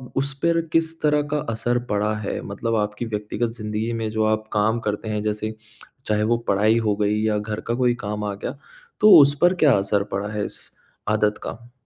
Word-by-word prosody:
उस 135 Hz, +1 st, 0 dB
पर 170 Hz, 0 st, +3 dB
किस 165 Hz, 0 st, +1 dB
तरह 150 Hz, -1 st, +3 dB
का 150 Hz, -, +1 dB, 0.2 s
असर 120 Hz, +2 st, 0 dB
पड़ा 105 Hz, +1 st, +1 dB
है? 105 Hz, -, -3 dB
मतलब 115 Hz, +3 st, -3 dB
आपकी 105 Hz, +2 st, -1 dB
व्यक्तिगत 110 Hz, +2 st, -3 dB
ज़िंदगी 105 Hz, +1 st, -3 dB
में 115 Hz, -1 st, -2 dB
जो 110 Hz, 0 st, 0 dB
आप 110 Hz, 0 st, 0 dB
काम 110 Hz, +2 st, +2 dB
करते 105 Hz, +1 st, -2 dB
हैं, 105 Hz, -1 st, -1 dB
जैसे 110 Hz, +1 st, -2 dB, 0.5 s
चाहे 105 Hz, 0 st, +1 dB
वो 115 Hz, +2 st, +2 dB
पढ़ाई 105 Hz, +3 st, +3 dB
हो 105 Hz, -, +2 dB
गई 105 Hz, +1 st, 0 dB
या 110 Hz, -1 st, +1 dB
घर 105 Hz, 0 st, -4 dB
का 115 Hz, -, 0 dB
कोई 125 Hz, -1 st, +2 dB
काम 105 Hz, +1 st, -3 dB
आ 100 Hz, -, -2 dB
गया, 130 Hz, +7 st, -6 dB, 0.4 s
तो 215 Hz, -1 st, +7 dB
उस 140 Hz, 0 st, +4 dB
पर 175 Hz, +1 st, +5 dB
क्या 145 Hz, -4 st, +6 dB
असर 100 Hz, +1 st, +1 dB
पड़ा 100 Hz, +1 st, -2 dB
है 105 Hz, -1 st, -1 dB
इस -, -, -7 dB, 0.5 s
आदत 105 Hz, 0 st, +1 dB
का? 120 Hz, +1 st, -8 dB
110 Hz, 205 wpm, -23 LUFS, 105-120 Hz, 0.5 s, तो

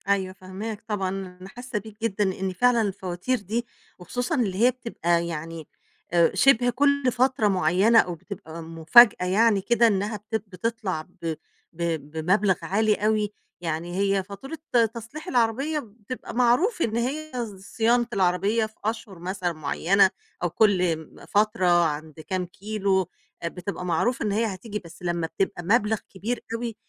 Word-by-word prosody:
أيوه 190 Hz, -2 st, +1 dB
فاهماك 200 Hz, +3 st, -7 dB
طبعًا. 200 Hz, -4 st, -1 dB
أنا 185 Hz, -1 st, -7 dB
حاسّة 245 Hz, 0 st, -5 dB
بيك 215 Hz, +1 st, -13 dB
جدًا، 210 Hz, -2 st, 0 dB
لإن 190 Hz, 0 st, -2 dB
فعلًا 245 Hz, +4 st, +3 dB
الفواتير 195 Hz, +4 st, -2 dB
دي 220 Hz, +5 st, -3 dB, 0.3 s
وخصوصًا 245 Hz, -, -2 dB
اللي 210 Hz, -8 st, 0 dB
هي 250 Hz, -, +6 dB
بتبقى 175 Hz, -9 st, -1 dB
يعني 165 Hz, -1 st, -6 dB, 0.4 s
آآ 170 Hz, +2 st, +3 dB
شِبه 245 Hz, +3 st, +5 dB
كل 280 Hz, +1 st, +2 dB
فترة 250 Hz, -3 st, +2 dB
معيّنة 190 Hz, +4 st, +4 dB
أو 175 Hz, -4 st, +1 dB
بتبقى 165 Hz, -2 st, -9 dB
مفاجأة 165 Hz, +6 st, +6 dB
يعني 205 Hz, +2 st, +3 dB
كده 235 Hz, +3 st, +4 dB
إنّها 205 Hz, +1 st, 0 dB
بت 215 Hz, +2 st, -6 dB
بتطلع 200 Hz, -3 st, -3 dB
ب 165 Hz, +1 st, -5 dB, 0.4 s
ب 170 Hz, -, -10 dB, 0.3 s
بمبلغ 185 Hz, +5 st, +2 dB
عالي 210 Hz, +5 st, +2 dB
أوي. 210 Hz, -1 st, 0 dB, 0.3 s
يعني 170 Hz, +1 st, -3 dB
هي 195 Hz, 0 st, +1 dB
فاتورة 205 Hz, +11 st, -8 dB, 0.4 s
تصليح 235 Hz, +7 st, -8 dB
العربية 255 Hz, +6 st, +1 dB
بتبقى 230 Hz, 0 st, -8 dB
معروف 250 Hz, -, +3 dB
إن 225 Hz, -5 st, 0 dB
هي 295 Hz, +6 st, -2 dB
ص 235 Hz, -5 st, -4 dB, 0.2 s
صيانة 235 Hz, +1 st, +3 dB
العربية 195 Hz, +4 st, +2 dB
في 220 Hz, -, -12 dB
أشهُر 220 Hz, -4 st, -3 dB
مثلًا 180 Hz, 0 st, -2 dB
معيّنة 170 Hz, +6 st, +3 dB, 0.3 s
أو 175 Hz, -, +2 dB
كل 180 Hz, -3 st, +3 dB, 0.2 s
م -, -, -13 dB
فترة 210 Hz, -2 st, +2 dB, 0.2 s
عند 155 Hz, 0 st, -4 dB
كام 180 Hz, +3 st, -3 dB
كيلو، 195 Hz, +1 st, -1 dB, 0.4 s
آآ -, -, 0 dB
بتبقى 180 Hz, +1 st, -5 dB
معروف 180 Hz, +9 st, 0 dB
إن 210 Hz, -, 0 dB
هي 220 Hz, +3 st, +1 dB
هتيجي، 210 Hz, +1 st, -4 dB
بس 170 Hz, 0 st, -14 dB
لمّا 170 Hz, -2 st, -1 dB
بتبقى 175 Hz, +2 st, -2 dB
مبلغ 215 Hz, +3 st, +2 dB
كبير 215 Hz, +6 st, -3 dB
أوي، 230 Hz, -1 st, -3 dB
200 Hz, 155 wpm, -25 LUFS, 180-230 Hz, 0.4 s, هي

